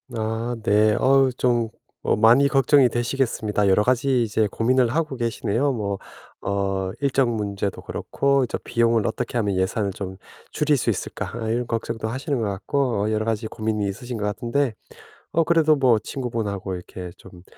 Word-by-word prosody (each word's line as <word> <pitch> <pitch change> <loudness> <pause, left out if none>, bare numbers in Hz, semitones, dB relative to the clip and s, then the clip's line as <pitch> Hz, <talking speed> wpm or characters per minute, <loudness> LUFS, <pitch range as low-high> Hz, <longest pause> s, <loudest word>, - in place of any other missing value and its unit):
아, 115 +2 -2
네. 105 0 +4
어 135 0 +4
좀 120 -3 +1 0.3
어 - - +2
많이 115 +6 +5
걱정이 135 -1 +4
되시겠습니다. 115 -4 0
여러 105 +2 +4
가지 125 0 +2
이제 110 -1 +1
고민을 125 +2 +2
하고 155 -5 0
계시네요. 120 +3 0
뭐 100 -5 -3 0.4
어 95 -1 -1
일정 135 -4 +2
문제도 100 -2 -3
그렇고 140 -1 0
이제 - - -3
'비용을 115 -2 +2
어떻게 120 +2 -2
하면 100 -4 0
예산을 95 +2 0
좀 95 -1 -6 0.3
줄일 150 -1 +2
수 130 - 0
있을까?' - - -3
아 110 - -3
이런 120 +1 -1
걱정도 115 -1 -3
하시는 135 +3 -2
것 - - 0
같고 105 +3 -1
어 110 - 0
여러 110 0 0
가지 110 0 -1
고민이 110 -2 -2
있으신 120 +4 -5
것 105 - -2
같은데 120 +4 -1 0.6
어, 165 - +4
그래도 160 -2 +4
뭐 125 -5 +3
친구분하고 110 -7 -4
이렇게 90 0 -7
좀 90 -1 -14
115 Hz, 350 characters per minute, -23 LUFS, 105-130 Hz, 0.6 s, 많이